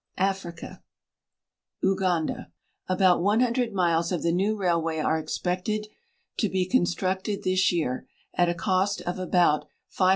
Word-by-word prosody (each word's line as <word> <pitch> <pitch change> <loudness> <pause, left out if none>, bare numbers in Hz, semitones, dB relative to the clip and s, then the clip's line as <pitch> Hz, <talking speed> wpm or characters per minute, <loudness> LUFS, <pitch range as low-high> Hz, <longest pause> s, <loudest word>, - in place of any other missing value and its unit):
AFRICA 190 -3 -3 1.0
Uganda. 185 -4 0 0.4
About 185 -2 +4
100 235 +4 +2
miles 170 -3 +1
of 175 - -1
the 170 - +2
new 200 +5 +1
railway 170 -4 0
are 160 +1 +1
expected 185 +6 -2 0.5
to 215 - +1
he 185 -1 0
con 185 -3 +3
structed 190 +3 -2
this 185 0 +3
year, 155 -8 -2 0.3
at 175 -1 +2
a 175 - -1
cost 190 +2 0
of 180 +1 -4
about 175 -4 +2 0.3
£520,000. 185 -1 +3
185 Hz, 135 wpm, -26 LUFS, 170-195 Hz, 1.0 s, About